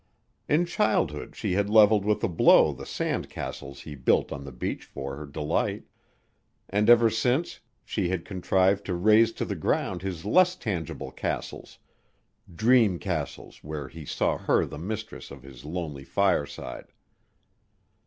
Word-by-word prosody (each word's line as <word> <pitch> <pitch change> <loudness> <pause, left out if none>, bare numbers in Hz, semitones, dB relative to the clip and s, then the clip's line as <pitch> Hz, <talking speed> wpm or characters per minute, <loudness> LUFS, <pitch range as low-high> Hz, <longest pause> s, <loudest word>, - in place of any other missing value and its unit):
In 160 +4 +3
childhood 90 - 0
she - - -3
had 100 +2 +1
leveled 105 -1 +5
with 105 +1 +1
a - - +3
blow 85 -4 +5
the - - -10
sand - - -2
castles 70 -1 -7
he 75 - -8
built 65 -3 +1
on 70 0 -6
the 70 - -8
beach 60 - -4
for 70 0 -7
her 75 +1 -8
delight, 75 +1 -2 0.8
and 105 +3 +1
ever 120 -1 +7
since 125 +9 0 0.3
she 95 -5 -1
had 90 -2 -2
contrived 95 +1 +1
to 90 - -2
raze 110 +5 +4
to - - -3
the 100 - -3
ground 80 - -1
his 95 -3 -5
less 180 - +4
tangible 90 - -4
castles, - - -5 0.7
dream 110 0 +3
castles 85 -6 -5
where 75 -3 -6
he 80 -1 -10
saw - - -1
her - - +2
the - - -8
mistress 110 +5 -6
of 70 -2 -11
his 65 0 -13
lonely 75 -4 -5
fireside. 85 -8 -1
95 Hz, 155 wpm, -27 LUFS, 75-110 Hz, 0.8 s, ever